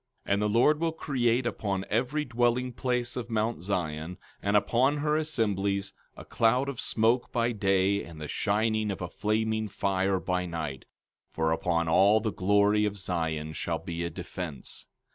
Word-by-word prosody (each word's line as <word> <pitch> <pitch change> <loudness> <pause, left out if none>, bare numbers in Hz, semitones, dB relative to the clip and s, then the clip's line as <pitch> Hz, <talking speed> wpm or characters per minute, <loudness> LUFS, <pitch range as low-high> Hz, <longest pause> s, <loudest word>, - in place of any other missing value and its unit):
14:5 - - +1
And 100 - +1
the 105 - +1
Lord 125 +8 +4
will 165 0 +1
create 125 -6 0
upon 100 -4 -2
every 130 +7 0
dwelling 120 +1 +1
place 125 -1 -1
of 125 -1 -4
mount 110 -2 -1
Zion, 85 -3 -3 0.2
and 100 +1 +3
upon 130 +7 +2
her 150 +1 +1
assemblies, 100 -10 0 0.2
a - - -10
cloud 125 +5 +2
and 135 - -6
smoke 115 +3 +1
by 120 -1 +1
day 100 -2 +2
and 80 -2 -11
the 75 - -5
shining 110 +3 0
of 95 -2 -3
a - - -2
flaming 110 +2 0
fire 95 -1 0
by 90 +1 -1
night; 80 -6 -5 0.4
for 80 0 0
upon 85 0 0
all 100 +6 +5
the 110 -2 -2
glory 105 +2 +3
of 105 -1 -1
Zion 80 -5 -2
shall 85 +1 -2
be 85 -1 -5
a 85 - -2
defence. 85 -4 -6
105 Hz, 170 wpm, -28 LUFS, 90-120 Hz, 0.4 s, all